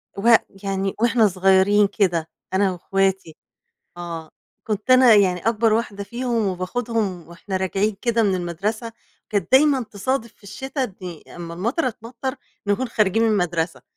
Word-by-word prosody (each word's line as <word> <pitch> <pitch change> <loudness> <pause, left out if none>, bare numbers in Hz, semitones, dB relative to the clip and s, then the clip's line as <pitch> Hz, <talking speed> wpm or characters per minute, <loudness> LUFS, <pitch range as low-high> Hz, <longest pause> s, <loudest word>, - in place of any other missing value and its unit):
و 230 +4 +5 0.3
يعني 195 0 -1
وإحنا 230 -1 +4
صغيرين 195 +2 +4
كده 175 -6 0 0.2
أنا 190 0 +2
واخواتي، 190 -2 -1 0.6
آه، 170 -2 -7 0.3
كنت 210 +2 -3
أنا 255 -3 +7
يعني 185 -3 +3
أكبر 225 -1 +2
واحدة 215 -3 -1
فيهم 235 -1 -1
وباخدهم 195 -1 -2
وإحنا 185 +3 -5
راجعين 195 +2 0
كده 235 -1 +2
من 200 -3 +2
المدرسة، 200 +6 -3 0.4
كانت 205 -2 -1
دايمًا 270 0 +5
تصادف 225 +3 -3
في - - -33
الشتا 260 +4 -4 0.4
أمّا 170 -1 -7
المطَره 240 - -1
تمطَّر 240 +3 -6 0.3
نكون 205 +5 0
خارجين 220 -1 +2
من 230 - +3
المدرسة، 175 -5 -1
205 Hz, 140 wpm, -22 LUFS, 185-230 Hz, 0.6 s, أنا